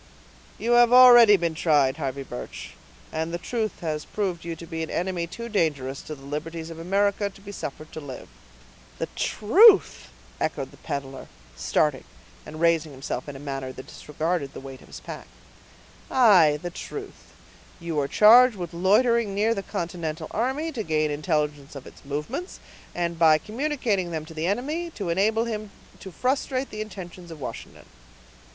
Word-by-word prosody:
"You 235 - -2
have 240 0 +6
already 240 -4 +9
been 170 -2 -1
tried, 145 -4 +2
Harvey 140 -2 -3
Birch; 125 -2 -8 0.4
and 160 +1 -2
the 170 - -2
truth 220 +3 -3
has 155 -3 -3
proved 190 -5 -3
you 170 0 -5
to 170 - -10
be 165 0 -5
an 160 - -4
enemy 175 -1 -2
too 235 +7 -7
dangerous 145 - -1
to 155 - -7
the 135 -1 -15
liberties 160 +3 -5
of 165 - -9
America 200 +3 +1
to 195 - -17
be 200 +1 -10
suffered 155 -4 -7
to - - -7
live." 140 -4 -9 0.7
"The - - -2
truth!" 390 - +5 0.3
echoed - - -2
the - - -17
peddler, 135 -1 -6 0.3
starting, 135 - 0 0.4
and 155 +1 -8
raising 165 -2 +2
himself 135 +2 -5
in 145 - -8
a - - -8
manner 135 -2 -5
that 130 0 -10
disregarded 155 -1 -3
the - - -6
weight 135 -1 -10
of - - -17
his - - -10
pack. - - -9 0.8
"Aye! 185 - +5
the 175 - -4
truth; 405 - -9 0.5
you 170 -3 -2
are 140 - 0
charged 235 - +7
with 175 -3 -6
loitering 210 +4 +2
near 215 +3 +2
the 195 - -3
continental 170 -5 -5
army, 265 +8 -1
to 250 -7 -4
gain 155 -5 0
intelligence 150 -2 -2
of 135 - -9
its - - -14
movements, 150 - -5 0.4
and, 170 -1 -2
by 160 -2 +6
communicating 225 - -2
them 160 -2 -4
to 160 - -11
the 160 +1 -2
enemy, 295 - -2
to 195 -5 -4
enable 215 +6 +2
him 215 -2 -4 0.3
to 190 - -9
frustrate 260 - -1
the 215 - -5
intentions 180 -4 -9
of 165 -2 -9
Washington." 130 - -8
170 Hz, 170 wpm, -25 LUFS, 155-215 Hz, 0.8 s, already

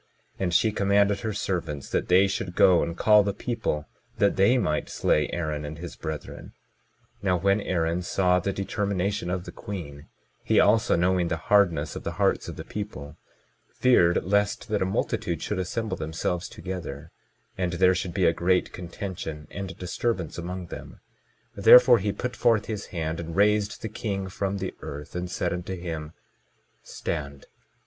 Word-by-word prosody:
And 95 -2 0
she 110 +6 +3
commanded 100 0 +2
her 110 -2 -3
servants 85 -8 -3
that - - 0
they 95 +2 +5
should 90 -2 -3
go 90 -2 +6
and 85 +1 -3
call 105 +2 +6
the 100 -1 -2
people, 110 -11 -2 0.3
that 100 - +3
they 100 +7 +4
might 80 -10 -1
slay 75 - +1
Aaron 75 -3 -3
and 75 +1 -6
his 85 0 -8
brethren. 80 -1 -7 0.7
22:22 - - -23
Now 90 -2 +3
when 100 +4 +2
Aaron 85 -2 0
saw 90 0 +2
the 100 +3 -1
determination 100 -1 -2
of 90 0 -2
the - - -8
queen, 75 -8 -8 0.4
he, - - +3
also 110 +3 +4
knowing 90 0 +2
the 80 - -1
hardness 85 -5 +2
of - - -6
the - - -3
hearts - - +1
of - - -6
the - - -7
people, 80 -9 -7 0.6
feared 90 -9 +4
lest 100 +6 0
that 105 -1 0
a - - +2
multitude 90 -2 -2
should 105 - -2
assemble 95 +1 -2
themselves 80 +2 -3
together, 85 -5 -7 0.4
and 90 -2 -1
there 90 +1 +4
should 90 -1 -3
be 95 -3 +2
a 80 - +4
great 90 +2 +1
contention 85 -3 -6
and 100 -1 -5
a 95 - -8
disturbance 90 -1 -2
among 90 +1 -5
them; - - -9 0.5
therefore 125 -1 +8
he 100 +1 -1
put 125 +4 -4
forth 110 -3 +3
his 105 -3 -5
hand 80 -2 -3
and 85 -1 -6
raised 105 +2 +2
the - - -1
king 100 -3 -3
from 100 +1 -2
the 95 -1 -4
earth, 75 +3 -8
and 90 0 -3
said 90 0 -1
unto 90 +1 -4
him: 80 -3 -6 0.7
Stand. 70 -4 -5
90 Hz, 175 wpm, -26 LUFS, 85-100 Hz, 0.7 s, therefore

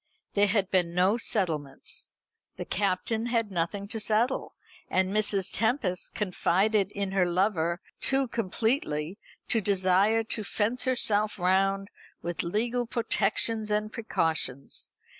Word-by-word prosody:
There 205 0 +4
had 200 -2 +1
been 175 -2 +1
no 185 +5 +3
settlements. 185 - -2 0.5
The - - -5
Captain 215 +4 -1
had 230 -3 0
nothing 190 +3 -2
to 220 - -2
settle, 220 +5 0 0.3
and 185 +1 +1
Mrs. 205 -3 +2
Tempest 220 -6 0
confided 200 +1 +1
in 200 -1 -2
her 190 -2 +2
lover 175 -2 0 0.2
too 270 0 +2
completely 215 - -1 0.3
to 225 - +2
desire 200 +3 +2
to 220 0 0
fence 225 +5 0
herself 215 -4 +2
round 195 +2 +1 0.3
with 175 0 -2
legal 235 +7 -1
protections 220 -1 +1
and 210 +1 -1
precautions. 160 - -1
205 Hz, 120 wpm, -28 LUFS, 185-225 Hz, 0.5 s, There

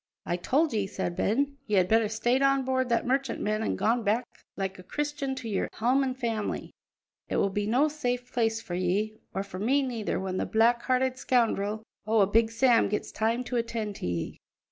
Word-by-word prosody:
"I 175 - 0
told 280 - +1
ye," 205 -3 0
said 190 -3 -3
Ben, 280 +9 0
"ye 210 -2 +2
had 180 -1 +4
better 225 +2 +3
stayed 240 +4 +1
on 275 -1 +3
board 260 -1 0
that 235 - +1
merchantman 250 -5 0
an' - - 0
gone 235 +2 +1
back 220 +4 +1 0.3
like 190 -1 -3
a - - -8
Christian 290 +5 -3
to 255 -3 -6
your 205 -3 0
ain - - -9
hame 255 +5 +3
an' 260 -1 -1
family. 230 -5 -3 0.6
It - - -1
will 200 - +2
be 205 +1 -1
no 255 +7 +3
safe 250 -5 -3
place 225 -2 +1
for 175 - -7
ye, 195 +5 -1 0.2
or 195 - 0
for 195 -2 -8
me 270 +7 +2
neither, 235 -5 -2
when 185 -1 -3
that - - -3
black 235 +2 +4
hearted 255 0 +1
scoundrel 220 -4 +1 0.2
o' 220 0 +4
a - - +6
Big 225 +3 +3
Sam 235 0 +3
gets 210 - -2
time 230 +3 0
to 250 0 -2
attend 230 -3 -2
to - - -4
ye." 85 -1 -3
230 Hz, 210 wpm, -28 LUFS, 205-255 Hz, 0.6 s, a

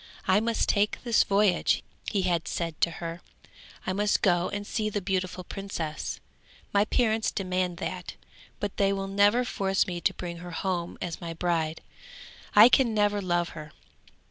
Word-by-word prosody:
'I 190 +2 +5
must 230 +1 0
take 205 0 +2
this 235 -3 +4
voyage,' 200 -3 +2 0.3
he 200 -3 0
had 170 -2 0
said 165 -3 -3
to - - +4
her; 170 0 -6 0.6
'I 185 - -1
must 205 +2 +1
go 175 -2 +3
and 205 0 -4
see 215 0 -1
the 210 - -2
beautiful 185 -1 -2
princess; 175 -6 -5 0.5
my 200 +1 +4
parents 220 -1 +1
demand 185 -2 -2
that, - - -5 0.4
but 205 -1 -4
they 195 -1 +3
will 195 0 -2
never 205 +5 +3
force 195 -4 +1
me 175 -2 -4
to - - +3
bring 170 -1 -6
her 175 +1 -8
home 175 0 -3
as 170 -2 -5
my 165 -1 -5
bride; 165 -2 -1 0.7
I 210 +2 +10
can 250 -3 +3
never 205 -1 +2
love 175 -2 0
her! 155 -2 -10
190 Hz, 170 wpm, -27 LUFS, 175-205 Hz, 0.7 s, I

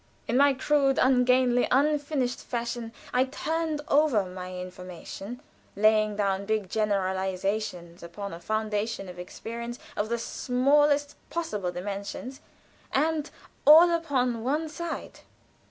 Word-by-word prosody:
In 230 - 0
my 280 +1 +5
crude, 275 0 +2
ungainly, 250 -1 +4
unfinished 285 -2 +1
fashion 235 -1 -4 0.2
I 250 +1 +4
turned 315 +3 -2
over 280 -9 +3
my 185 0 -7
information, 185 - -8 0.3
laying 215 0 +3
down 200 -1 0
big 215 -4 -1
generalizations 190 -3 -1
upon 185 +3 -7
a 165 - -7
foundation 215 +1 -2
of 180 -1 -9
experience 235 +6 -6 0.2
of 210 +1 -1
the 235 - 0
smallest 285 +5 +2
possible 210 - -2
dimensions, 200 +8 -6 0.5
and 310 +2 +1 0.4
all 325 +4 +9
upon 255 -9 0
one 300 +5 0
side." 340 +2 -6
235 Hz, 115 wpm, -27 LUFS, 200-280 Hz, 0.5 s, all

